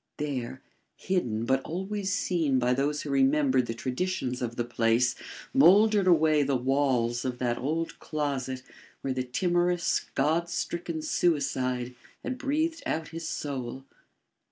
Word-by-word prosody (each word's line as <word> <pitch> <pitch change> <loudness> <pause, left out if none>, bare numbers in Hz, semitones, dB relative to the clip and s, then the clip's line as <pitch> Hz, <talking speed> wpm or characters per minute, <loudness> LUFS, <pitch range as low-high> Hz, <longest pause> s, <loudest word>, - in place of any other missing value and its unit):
There, 130 -4 -4 0.3
hidden 120 - -1
but 130 +2 +2
always 190 +5 -3
seen 165 -8 +1
by 125 0 +2
those 145 +3 0
who 145 - -4
remembered 135 -2 +3
the 115 - -3
traditions 130 +1 -2
of 120 -1 -3
the 120 - -1
place, 120 +1 +2 0.4
mouldered 210 -4 +6
away 155 -3 +5
the 140 -1 +1
walls 125 -2 +1
of 125 -2 -3
that 120 -1 -1
old 160 +5 -2
closet 135 -4 -3 0.4
where 135 - -1
the 130 - -1
timorous, 175 +6 0
God 160 +5 +1
stricken 170 -2 -3
suicide 130 -7 0 0.3
had 260 -1 -4
breathed 315 +4 -1
out 160 0 -2
his 165 0 -6
soul. 135 -2 -4
140 Hz, 135 wpm, -28 LUFS, 125-170 Hz, 0.4 s, mouldered